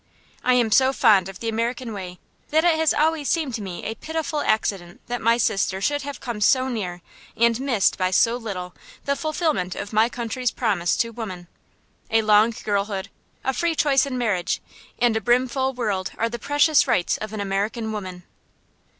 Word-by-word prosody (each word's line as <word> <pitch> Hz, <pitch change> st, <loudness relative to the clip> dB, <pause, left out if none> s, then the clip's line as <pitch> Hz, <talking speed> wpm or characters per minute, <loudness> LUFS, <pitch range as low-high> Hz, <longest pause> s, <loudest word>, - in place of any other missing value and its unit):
I 255 Hz, 0 st, +4 dB
am 235 Hz, -3 st, +2 dB
so 260 Hz, +4 st, +5 dB
fond 205 Hz, -8 st, +4 dB
of 195 Hz, -, -11 dB
the 230 Hz, -, -3 dB
American 230 Hz, +1 st, -2 dB
way 180 Hz, -3 st, -7 dB, 0.3 s
that 315 Hz, +1 st, +3 dB
it 345 Hz, -1 st, +5 dB
has 320 Hz, -2 st, +3 dB
always 310 Hz, -1 st, +1 dB
seemed 310 Hz, -6 st, 0 dB
to 225 Hz, -, -3 dB
me 185 Hz, -3 st, -6 dB
a 220 Hz, -, -2 dB
pitiful 315 Hz, +5 st, -3 dB
accident 195 Hz, -7 st, -1 dB
that 245 Hz, 0 st, -4 dB
my 230 Hz, +1 st, +3 dB
sister 195 Hz, -4 st, 0 dB
should 290 Hz, +8 st, 0 dB
have 285 Hz, 0 st, -6 dB
come 235 Hz, -4 st, -5 dB
so 260 Hz, +5 st, +3 dB
near 180 Hz, -8 st, -4 dB, 0.3 s
and 235 Hz, 0 st, +3 dB
missed 245 Hz, -10 st, +1 dB
by 185 Hz, 0 st, +2 dB
so 230 Hz, +5 st, +3 dB
little 190 Hz, -7 st, -6 dB, 0.3 s
the 280 Hz, -, +1 dB
fulfilment 310 Hz, -, -1 dB
of 205 Hz, -, -6 dB
my 220 Hz, +2 st, +4 dB
country's 245 Hz, +1 st, -2 dB
promise 200 Hz, -8 st, 0 dB
to 230 Hz, -, 0 dB
women. 190 Hz, -6 st, -7 dB, 0.6 s
A 225 Hz, 0 st, +3 dB
long 215 Hz, +2 st, +5 dB
girlhood, 200 Hz, -1 st, -2 dB, 0.3 s
a 265 Hz, -, 0 dB
free 340 Hz, +3 st, 0 dB
choice 280 Hz, -2 st, +3 dB
in 255 Hz, -2 st, -3 dB
marriage, 210 Hz, -8 st, 0 dB, 0.4 s
and 240 Hz, -2 st, +2 dB
a 220 Hz, -, 0 dB
brimful 255 Hz, +4 st, +1 dB
womanhood 205 Hz, -7 st, -2 dB
are 230 Hz, -, 0 dB
the 235 Hz, +1 st, -6 dB
precious 290 Hz, +3 st, +3 dB
rights 175 Hz, -, +1 dB
of 215 Hz, -1 st, -6 dB
an 215 Hz, -, -5 dB
American 205 Hz, +3 st, -2 dB
woman. 185 Hz, -4 st, -6 dB
230 Hz, 185 wpm, -23 LUFS, 200-260 Hz, 0.6 s, so